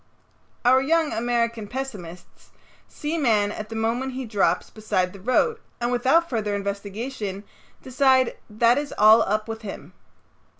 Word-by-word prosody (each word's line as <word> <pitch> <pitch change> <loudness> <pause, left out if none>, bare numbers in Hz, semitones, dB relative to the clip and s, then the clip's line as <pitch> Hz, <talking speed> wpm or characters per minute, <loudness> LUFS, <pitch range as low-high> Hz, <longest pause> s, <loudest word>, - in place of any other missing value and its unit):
Our 260 +2 +6
young 320 +3 +1
American 235 -1 -1
pessimists 205 -9 -8 0.4
see 310 +3 -4
man 215 -7 +2
at 215 0 -7
the 225 - -6
moment 235 +4 -1
he 260 0 -4
drops 200 -6 0
beside 200 -4 -1
the 200 - -11
road, 450 - +1 0.2
and 240 0 -1
without 265 +8 +3
further 215 -7 -2
investigation 200 +1 -5 0.4
decide 260 -1 +3
that 230 +4 +3
it - - 0
is 290 - -8
all 215 +2 +7
up 215 +2 -1
with 225 0 -6
him. 205 -3 -9
230 Hz, 145 wpm, -24 LUFS, 210-260 Hz, 0.4 s, all